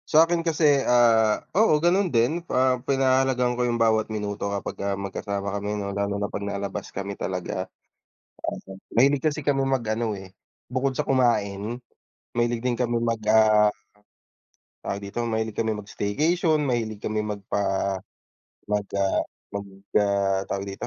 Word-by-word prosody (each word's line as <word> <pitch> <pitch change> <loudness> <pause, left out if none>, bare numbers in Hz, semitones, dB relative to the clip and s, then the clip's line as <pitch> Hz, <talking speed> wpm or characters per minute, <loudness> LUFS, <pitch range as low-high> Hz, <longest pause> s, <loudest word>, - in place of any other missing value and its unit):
Sa'kin 165 +2 +5
kasi, 155 -4 +3
ah, 115 -4 +4
o,o 210 -6 +4
ganun 180 +4 +2
din, 125 +6 +2
ah, 130 -1 +2
pinahahalagahan 130 -2 +2
ko 125 - -2
'yung 120 - 0
bawat 110 -1 +3
minuto 105 -1 -3
kapagka 100 0 -3
magkasama 100 0 -4
kami 105 +1 -2
ano 100 -1 -3
lalo 100 0 -1
na 100 0 -3
pag - - -3
nalabas 100 -1 -4
kami 100 +1 -5
talaga. 90 -2 -4
Aha. - - -59 1.1
Mahilig 135 +3 +5
kasi 155 -1 -1
kami 140 -2 +2
mag-ano 115 -4 -1
eh, 95 -1 -11 0.3
bukod 130 +1 -1
sa - - 0
kumain, 115 -4 +1 0.5
mahilig 120 0 0
din 125 -2 0
kami 120 -1 0
mag 115 -1 0
ah 110 -1 +5 1.1
Tawag 100 - -2
dito, 100 +4 -4
mahilig 110 -1 -1
kami 110 +1 0
mag-staycation, 155 - 0
mahilig 115 -5 -1
kami 110 0 0
magpa 105 -2 -4 1.1
mag 105 -1 0
ah 100 -1 +1 0.3
mag, 100 0 -5 0.3
ah, 100 -1 +2
tawag 100 0 -3
dito, 100 +5 -6
110 Hz, 145 wpm, -25 LUFS, 100-130 Hz, 1.1 s, Sa'kin